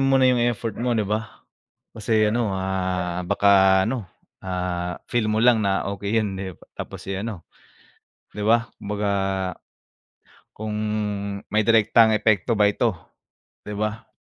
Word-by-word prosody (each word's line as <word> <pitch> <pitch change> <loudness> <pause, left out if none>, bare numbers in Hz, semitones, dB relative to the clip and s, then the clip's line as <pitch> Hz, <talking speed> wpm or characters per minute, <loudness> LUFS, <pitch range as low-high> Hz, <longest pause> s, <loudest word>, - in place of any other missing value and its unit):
mo 135 0 +4
muna 130 - +4
yung 125 - +1
effort 115 -1 -3
mo, 120 -1 +1
'di 110 - +1
ba? 105 +2 -4 0.5
Kasi 110 0 +1
ano, 110 -3 0
ah, 90 -2 -2
baka 95 0 +5
ano, 115 0 -2 0.3
ah, 90 -1 -3 0.2
feel 120 -3 +1
mo 110 +1 +1
lang 120 -1 +5
na 100 -2 0
okey 100 +3 -1
yun 95 -2 -4 0.4
tapos - - -7
eh, 95 - -2
ano. 105 -7 -6 0.9
Di 105 - -6
ba, 115 +2 +3 0.2
kumbaga 105 0 -2 1.4
kung 105 0 -4 0.7
may 110 0 +2
direktang 110 0 +5
epekto 110 +1 +2
ba 105 -1 +4
ito, 110 -1 0 0.7
'di 105 0 -7
ba? 110 +1 -3
105 Hz, 140 wpm, -23 LUFS, 95-115 Hz, 1.4 s, baka